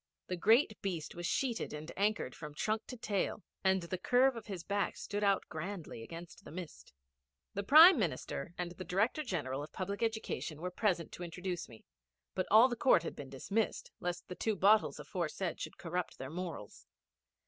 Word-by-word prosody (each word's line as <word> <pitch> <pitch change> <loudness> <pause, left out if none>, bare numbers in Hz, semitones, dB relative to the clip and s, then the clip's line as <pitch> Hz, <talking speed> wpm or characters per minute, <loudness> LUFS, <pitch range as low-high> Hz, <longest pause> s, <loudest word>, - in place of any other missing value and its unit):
The 180 - 0
great 220 - +4
beast 170 -6 -3
was 175 0 -4
sheeted 245 - -1
and 150 +2 -6
anchored 205 -9 0
from 150 -2 -9
trunk 215 +5 -1
to 250 - -7
tail, 210 -1 -1 0.2
and 190 -1 +3
the 175 +2 -4
curve 250 +5 +4
of 230 -1 -8
his 190 -5 -5
back 200 +1 -1
stood 205 0 -3
out 200 -2 +2
grandly 170 - -6
against 170 +7 -9
the - - -11
mist. 170 0 -8 0.6
The 200 - -1
Prime 310 - +9
Minister 175 -2 -2
and 175 -1 -3
the 180 +1 -7
Director 205 - +1
General 145 - -2
of 150 - -8
Public 200 +2 -4
Education 220 -8 -2
were 180 +2 -3
present 180 -4 0
to 180 - -7
introduce 175 0 -4
me, 115 -2 -14 0.5
but 185 - -1
all 220 +4 +8
the 240 - -2
court 230 -8 +4
had - - -5
been 140 -2 -8
dismissed, 200 +12 -2
lest 175 0 -3
the - - -5
two 220 +3 -1
bottles 205 +3 +4
aforesaid 175 0 -3
should - - -6
corrupt 180 0 -3
their 130 +1 -6
morals. 170 - -6
185 Hz, 185 wpm, -34 LUFS, 170-215 Hz, 0.6 s, Prime